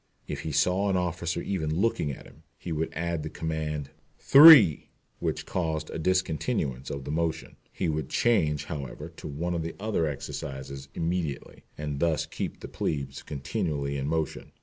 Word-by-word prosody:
If - - -4
he 80 - -4
saw 90 +7 +2
an 95 - +2
officer 85 -1 -2
even 80 -6 -1
looking 110 -8 +1
at 70 - -7
him, 75 - -17 0.2
he 85 - -7
would 80 +1 -1
add 85 0 -2
the - - -5
command 75 -3 -3 0.3
"three," 140 - +9 0.3
which - - -2
caused 80 -3 -2
a - - -4
discontinuance 80 - 0
of 70 -1 -5
the 70 - -5
motion. 80 +1 -2 0.2
He - - -2
would 80 -1 -2
change, 85 -11 +2
however, 75 +2 -6
to - - -7
one 80 +5 -3
of 85 - -1
the 85 +1 -5
other 100 -6 0
exercises 70 -1 -6
immediately, 85 -3 -3
and 75 -2 -4
thus 85 -1 +1
keep - - -5
the - - -6
plebes 70 -3 -3
continually 75 -1 -3
in 70 0 -2
motion. 80 0 -2
80 Hz, 170 wpm, -28 LUFS, 75-85 Hz, 0.3 s, three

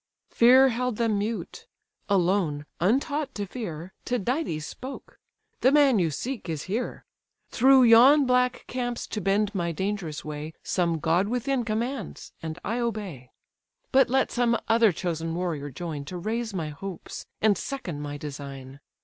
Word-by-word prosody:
Fear 260 +3 +6
held 250 0 -1
them 225 -3 +1
mute: 220 +2 -4 0.4
alone, 175 -6 +1
untaught 275 - 0
to 205 - -3
fear, 185 -5 -6
Tydides 245 - -1
spoke—"The 260 0 -4
man 280 -6 +5
you 170 -3 +2
seek 230 - -5
is 155 -3 -3
here. 220 +6 -4 0.5
Through 265 +1 +6
yon 255 +5 +7
black 250 0 +2
camps 245 -1 -3
to 215 - -4
bend 200 +2 +1
my 170 -3 -1
dangerous 190 -3 -3
way, 150 +1 -6
Some 170 -3 0
god 170 +5 +1
within 250 +2 0
commands, 230 0 -4
and 160 0 -5
I 230 +4 -1
obey. 200 - -4 0.6
But 265 -2 +5
let 265 +1 +2
some 240 -1 +2
other 225 -2 +5
chosen 165 -1 -3
warrior 165 -5 -3
join, 155 0 -5
To 180 +5 -6
raise 220 +5 -2
my 165 -6 -3
hopes, 180 +5 -8
and 215 -2 +4
second 190 - -5
my 145 0 -5
design. 140 -2 -8
205 Hz, 145 wpm, -26 LUFS, 165-245 Hz, 0.6 s, yon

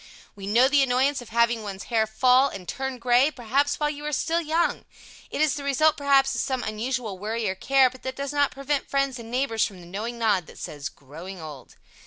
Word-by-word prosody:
We 195 -1 -8
know 235 +5 +5
the 285 +1 +4
annoyance 265 +1 +2
of 245 - -12
having 235 0 +2
one's 195 -2 -6
hair 220 -2 +1
fall 255 +4 +4
and 180 -3 -9
turn 265 -1 -4
gray, 245 +3 +4
perhaps 275 +2 0
while 295 -1 +1
you 295 0 -8
are - - -2
still 330 +4 0
young. 330 +2 0 0.5
It - - -3
is 310 -2 +3
the 285 - -5
result 280 +3 +3
perhaps 275 -1 +3
of - - -1
some 260 -2 -2
unusual 220 -2 -3
worry 220 +2 -2
or 190 - 0
care, 265 +7 +4
but 255 0 -9
that 260 0 -5
does 280 +1 -4
not 285 -1 +3
prevent 275 +1 -3
friends 275 -2 0
and 230 -1 -9
neighbors 245 -3 0
from 195 -3 -3
the 175 - -12
knowing 215 +7 -5
nod 210 -7 +1
that - - -14
says, 145 -1 -6
"Growing 165 +7 -10
old." 150 -5 -10
250 Hz, 225 wpm, -25 LUFS, 215-275 Hz, 0.5 s, know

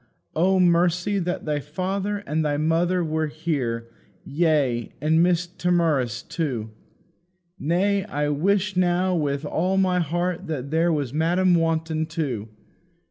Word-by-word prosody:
O 185 +4 +3
Mercy, 180 +3 +2
that 180 0 -3
thy 150 -1 0
father 190 +7 -3
and 155 +2 0
thy 145 -1 0
mother 170 +4 +1
were 160 -1 -1
here; 140 -7 -2 0.4
yea, 140 -7 +1
and 155 +2 +2
Mrs. 175 0 0
Timorous 160 -9 +1
too! 125 -10 -3 0.9
Nay, 190 +5 +1
I 145 +1 -2
wish 190 +6 +1
now 180 0 +2
with 145 -2 -1
all 180 +6 0
my 185 -1 +2
heart 175 +2 -2
that 145 -2 -4
here 165 +2 +3
was 145 -5 -1
Madam 175 +4 +2
Wanton 160 -1 0
too. 135 -10 -3
165 Hz, 135 wpm, -24 LUFS, 150-180 Hz, 0.9 s, O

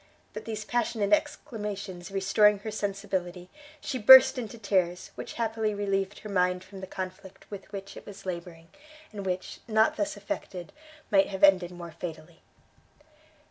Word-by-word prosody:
But - - -7
these 215 -1 -5
passionate 225 -3 0
exclamations 205 -5 -2
restoring 195 +2 +4
her 220 - -3
sensibility, 190 -3 -3 0.3
she 265 -3 -4
burst 260 +3 +9
into 235 -1 -6
tears, 185 -4 0
which - - -7
happily 220 -2 -1
relieved 195 -1 -1
her - - -8
mind 180 -1 +1
from 190 0 -11
the 190 - -6
conflict 185 +1 -8
with 200 -1 -9
which 195 -1 -7
it - - -12
was 200 -2 -11
labouring, 170 -2 -6 0.4
and 200 -3 -6
which, 185 0 -3
not 220 +7 +3
thus 305 0 -2
effected, 185 - -6 0.4
might 195 -1 +5
have 195 0 -6
ended 190 -3 +6
more 175 -1 -9
fatally. 165 0 -8
195 Hz, 150 wpm, -28 LUFS, 180-215 Hz, 0.4 s, burst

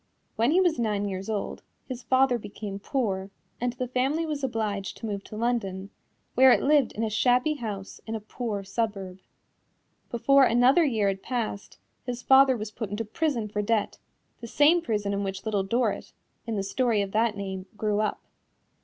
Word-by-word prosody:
When 230 +2 +2
he 340 +5 +4
was 350 -6 +2
nine 210 -3 0
years 195 +1 -5
old, 210 -2 -3 0.3
his 255 -2 -6
father 255 0 +3
became 205 -1 -7
poor 200 -6 -2 0.3
and 245 0 -1
the 250 0 -3
family 270 +6 0
was 300 -3 -4
obliged 215 -6 -2
to - - -7
move 200 -2 -3
to - - -9
London, 205 -4 -2 0.4
where 260 +1 +7
it - - +4
lived 285 -3 +3
in 225 - -3
a 220 - 0
shabby 250 +7 +3
house 210 -8 -6
in 225 - -3
a - - -3
poor 215 -1 -4
suburb. 195 -2 -3 0.9
Before 275 +3 +4
another 250 +8 +5
year 225 -9 +1
had 195 -1 -1
passed, 230 -5 -4 0.3
his 245 0 -5
father 265 -1 +6
was 215 -1 -5
put 220 -2 -5
into 210 +3 -3
prison 240 -1 -1
for 210 0 -2
debt 210 0 0 0.4
the 235 - -8
same 300 +8 +4
prison 210 -8 -1
in 200 0 -1
which 195 +1 -5
Little 210 -2 +1
Dorrit, 230 +6 -1 0.3
in 225 - -2
the 200 - -1
story 215 +1 +1
of 195 - -6
that 220 0 +1
name, 190 -1 -5
grew 210 -1 0
up. 215 - -1
225 Hz, 185 wpm, -27 LUFS, 200-255 Hz, 0.9 s, where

